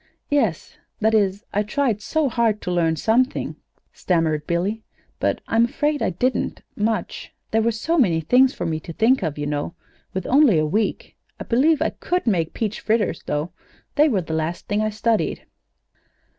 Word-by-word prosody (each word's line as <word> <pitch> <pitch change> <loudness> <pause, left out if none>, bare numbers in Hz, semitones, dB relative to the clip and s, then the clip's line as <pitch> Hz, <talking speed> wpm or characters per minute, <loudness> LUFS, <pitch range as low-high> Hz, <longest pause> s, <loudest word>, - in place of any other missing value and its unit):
"Yes; 230 - 0 0.2
that 220 +1 +2
is 205 0 +1
I 205 - +2
tried 220 0 0
so 315 +5 0
hard 230 -3 +1
to 180 - -3
learn 165 -2 +2
something," 245 - +1 0.4
stammered 160 -4 0
Billy. 190 +6 -1 0.4
"But - - 0
I'm 230 +1 +3
afraid 295 +3 -1
I - - +1
didn't 245 +8 -1
much; 210 -2 -2 0.2
there 225 - +3
were 230 +1 +2
so 320 +10 0
many 175 -11 +3
things 250 +11 +4
for 175 - -5
me 160 -2 -1
to 165 +1 -9
think 235 +8 +3
of, 160 -5 -2
you 145 - -3
know, 145 +2 -3 0.4
with 190 -1 -4
only 270 - +5
a 155 - +2
week. 210 +8 -2 0.2
I - - -4
believe 285 +6 +3
I - - 0
could 360 +1 -2
make 175 -8 0
peach 215 -2 -2
fritters, 215 -6 0
though. 150 +4 -2 0.4
They 300 +1 +4
were 205 -8 +1
the 160 -1 -6
last 160 +2 -3
thing 205 +1 0
I 215 - +1
studied." 215 +1 -1
215 Hz, 180 wpm, -22 LUFS, 170-240 Hz, 0.4 s, only